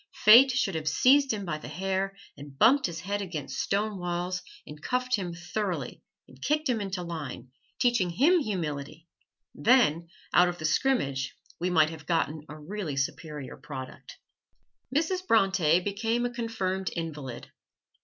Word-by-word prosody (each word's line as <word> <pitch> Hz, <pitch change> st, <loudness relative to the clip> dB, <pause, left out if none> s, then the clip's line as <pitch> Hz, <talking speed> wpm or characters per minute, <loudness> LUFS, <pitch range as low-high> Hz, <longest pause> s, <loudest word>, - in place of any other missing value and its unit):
Fate 240 Hz, +6 st, +9 dB
should 240 Hz, -7 st, 0 dB
have 160 Hz, -1 st, -4 dB
seized 275 Hz, +1 st, +4 dB
him 205 Hz, -3 st, -3 dB
by 155 Hz, -3 st, -3 dB
the -, -, -9 dB
hair 190 Hz, +5 st, -2 dB, 0.2 s
and 140 Hz, -1 st, -12 dB
bumped 265 Hz, -, +5 dB
his 165 Hz, -2 st, -6 dB
head 200 Hz, +3 st, -2 dB
against 165 Hz, -7 st, -5 dB
stone 205 Hz, 0 st, -1 dB
walls 180 Hz, +1 st, -2 dB, 0.2 s
and 150 Hz, 0 st, -11 dB
cuffed 250 Hz, +4 st, 0 dB
him 185 Hz, -4 st, -4 dB
thoroughly, 170 Hz, -, -4 dB, 0.3 s
and 130 Hz, 0 st, -18 dB
kicked 300 Hz, -, 0 dB
him 235 Hz, -4 st, 0 dB
into 195 Hz, -2 st, -3 dB
line, 150 Hz, -7 st, -6 dB, 0.3 s
teaching 240 Hz, -7 st, +2 dB
him 290 Hz, -, +4 dB
humility, 160 Hz, -, -4 dB, 0.5 s
then 190 Hz, -, +3 dB, 0.3 s
out 180 Hz, 0 st, +6 dB
of 175 Hz, -, -5 dB
the 155 Hz, -, -5 dB
scrimmage 150 Hz, -, 0 dB, 0.2 s
we 180 Hz, -, 0 dB
might 160 Hz, -3 st, +4 dB
have 155 Hz, -2 st, -11 dB
gotten 160 Hz, -2 st, 0 dB
a 155 Hz, +1 st, -9 dB
really 165 Hz, -2 st, -5 dB
superior 145 Hz, 0 st, -4 dB
product. 130 Hz, -4 st, -9 dB, 0.7 s
Mrs. 325 Hz, +6 st, +1 dB
Bronte 190 Hz, -7 st, +4 dB
became 225 Hz, +5 st, -1 dB
a 245 Hz, -, -3 dB
confirmed 190 Hz, -6 st, -2 dB
invalid. 150 Hz, -7 st, -6 dB
180 Hz, 155 wpm, -28 LUFS, 155-225 Hz, 0.7 s, Fate